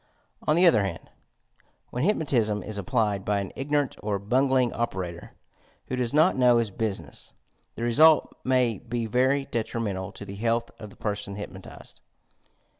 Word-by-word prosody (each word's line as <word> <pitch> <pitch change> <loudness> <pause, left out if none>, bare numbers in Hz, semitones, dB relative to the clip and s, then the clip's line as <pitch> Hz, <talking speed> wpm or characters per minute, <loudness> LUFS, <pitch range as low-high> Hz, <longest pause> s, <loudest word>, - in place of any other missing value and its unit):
On 150 - +4
the 175 +2 +5
other 110 - +5
hand, 95 -4 -5 0.8
when 125 - -2
hyp 210 +5 +3
notism 110 -9 0
ia 105 -2 -4
applied 105 -3 0
by 100 0 0
an 100 -2 -5
ignorant 145 0 0
or 105 -1 -1
bungling 125 +4 +2
operator, 90 -7 -4 0.6
who 130 - -1
does 125 -2 -1
not 155 +5 +4
know 125 -2 +5
his 115 -3 0
business, 95 - -4 0.4
the 115 - -5
result 150 +7 +5
may 125 -4 +2
be 120 -1 -3
very 130 +5 +2
detrimental 105 -5 -3
to 100 - -9
the 100 - -8
health 115 +2 0
of 105 - -8
the - - -16
person 100 -1 -4
hypnotized. 95 -2 -10
115 Hz, 160 wpm, -26 LUFS, 100-130 Hz, 0.8 s, the